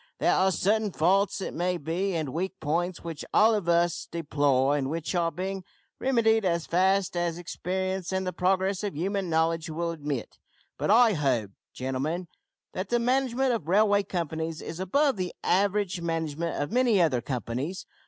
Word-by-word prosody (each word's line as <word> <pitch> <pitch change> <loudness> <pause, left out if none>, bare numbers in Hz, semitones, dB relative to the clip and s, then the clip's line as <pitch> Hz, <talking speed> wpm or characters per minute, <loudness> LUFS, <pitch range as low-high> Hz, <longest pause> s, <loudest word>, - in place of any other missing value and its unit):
There - - +2
are 190 +1 +3
certain 210 +4 +1
faults, 195 +5 +2
it - - -4
may 180 +1 0
be, 175 +5 -2
and 155 -4 -2
weak 185 +6 -3
points, 170 +4 -1
which 165 -3 -6
all 220 +2 +6
of 200 -5 -1
us 170 0 +2
deplore, 145 -4 +1
and 135 -2 -1
which 165 +3 -3
are 170 -2 +1
being 190 +1 -4 0.4
remedied 225 -4 +3
as 170 -3 0
fast 190 +1 +2
as 175 -1 -1
experience 185 +1 -3
and 190 0 -1
the 185 - -2
progress 190 +2 +1
of 205 -5 -3
human 195 +2 -1
knowledge 160 0 +1
will 170 +2 -2
admit, 145 -6 -5 0.4
but - - -2
I 225 +1 +6
hold, 130 - 0 0.2
gentlemen, 145 +7 -3 0.4
that 185 +1 -4
the 240 - +2
management 255 +1 +1
of 195 -10 -3
railway 205 +2 +4
companies 165 -4 -3
is 165 - -7
above 270 +8 +2
the 180 -1 -3
average 200 -1 +1
management 165 -1 -2
of 145 - -2
many 240 -4 +3
other 150 -8 +2
companies. 130 +7 -4
180 Hz, 170 wpm, -27 LUFS, 160-195 Hz, 0.4 s, all